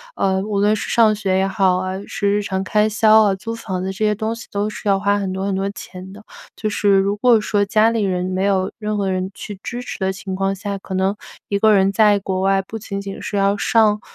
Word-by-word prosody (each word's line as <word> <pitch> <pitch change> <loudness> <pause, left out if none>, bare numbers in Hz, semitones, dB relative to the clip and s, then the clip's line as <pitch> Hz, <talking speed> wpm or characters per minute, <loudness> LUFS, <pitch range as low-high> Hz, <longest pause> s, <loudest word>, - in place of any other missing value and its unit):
呃， 190 -1 +1
无 205 0 -2
论 210 +1 +3
是 - - -5
上 220 -2 +4
学 195 -3 0
也 190 0 +1
好 190 -2 +2
啊， 185 +1 -3
是 200 - -1
日 205 +1 +1
常 190 -1 -2
开 210 +2 +2
销 220 +1 +5
啊， 205 -2 +2
租 225 +4 -6
房 190 -5 -4
子 - - -3
这 195 - -4
些 210 - +2
东 220 +2 -3
西 230 - -11
都 205 +1 -1
是 215 - -7
要 195 -1 +3
花 200 0 +1
很 195 -2 -3
多 190 +1 -3
很 195 - -1
多 195 +1 -1
钱 185 -2 -10
的。 210 +1 -13 0.3
就 215 - -3
是 205 -1 +2
如 195 +1 +1
果 235 0 +4
说 205 -1 +1
家 215 +2 +3
里 230 -1 -1
人， 180 -2 -1
没 185 +1 -2
有 195 -1 +1
任 210 -1 -2
何 200 -1 -1
人 185 0 -2
去 205 -1 -8
支 240 +1 -5
持 250 - -7
的 190 -1 0
情 190 0 -6
况 195 +1 0
下， 200 0 -5
可 195 0 -9
能 190 +2 +1 0.3
一 200 - 0
个 220 +1 +5
人 195 -1 +3
在 205 0 +4
国 190 -1 -3
外 195 0 +2
不 220 +4 -7
仅 200 -2 -5
仅 195 -1 -7
是 205 - -3
要 200 0 +2
上 210 0 +2
200 Hz, 280 characters per minute, -20 LUFS, 190-210 Hz, 0.3 s, 销